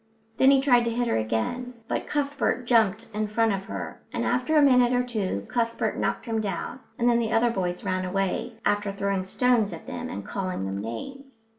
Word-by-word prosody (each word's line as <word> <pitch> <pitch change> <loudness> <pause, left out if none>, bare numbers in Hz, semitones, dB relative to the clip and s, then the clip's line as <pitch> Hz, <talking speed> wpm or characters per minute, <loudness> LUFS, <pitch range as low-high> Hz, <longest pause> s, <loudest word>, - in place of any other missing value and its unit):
Then 265 - +6
he 275 -1 +5
tried 245 -3 +4
to - - +1
hit 240 +1 0
her - - +1
again, 115 - -2
but - - -2
Cuthbert 285 -3 -1
jumped 225 -2 +3
in 215 0 -1
front 225 0 +2
of 195 0 -4
her, - - -6
and - - -2
after 250 +6 +1
a - - +7
minute 250 -3 +5
or 250 0 +2
two 205 - -2
Cuthbert 230 -1 -1
knocked - - -1
him 225 -2 -1
down; 200 +4 -4 0.2
and 240 - +1
then 235 -1 +4
the 225 -1 -1
other 235 +1 +3
boys 180 -4 -2
ran 185 -2 -1
away, 195 +5 -1
after 205 0 +1
throwing 195 -1 -1
stones 230 0 +2
at 165 - -9
them - - -5
and 100 0 -6
calling 185 - -3
them 95 +1 -3
names. 225 - -8
225 Hz, 205 wpm, -26 LUFS, 195-245 Hz, 0.2 s, a